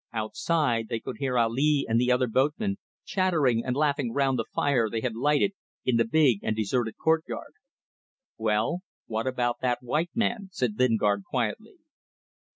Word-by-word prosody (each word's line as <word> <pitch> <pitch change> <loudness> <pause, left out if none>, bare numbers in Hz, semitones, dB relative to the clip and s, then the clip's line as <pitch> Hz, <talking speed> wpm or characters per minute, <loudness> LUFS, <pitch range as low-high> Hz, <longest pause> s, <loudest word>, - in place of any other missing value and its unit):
Outside, 115 +2 0
they 115 - -2
could 110 - -7
hear 130 -2 0
Ali 135 +5 +2
and 115 +1 +2
the 125 0 +2
other 125 +1 +3
boatmen 150 - 0 0.3
chattering 155 - +1
and 125 -1 -2
laughing 140 -5 +1
round 135 -1 +1
the 115 - -1
fire 125 -6 +1
they 115 +1 -2
had 125 -1 -2
lighted 150 - +2 0.3
in 125 -2 +2
the 115 - +3
big 130 -5 +3
and 110 - -1
deserted 110 +2 -1
courtyard. 160 0 -1 0.8
"Well, 110 +9 0 0.3
what 110 +2 -3
about 120 -2 0
that 125 -1 0
white 150 +8 0
man?" 225 -4 -1
said 125 - -2
Lingard, 105 -5 +2
quietly. 130 - -2
125 Hz, 160 wpm, -27 LUFS, 115-150 Hz, 0.8 s, other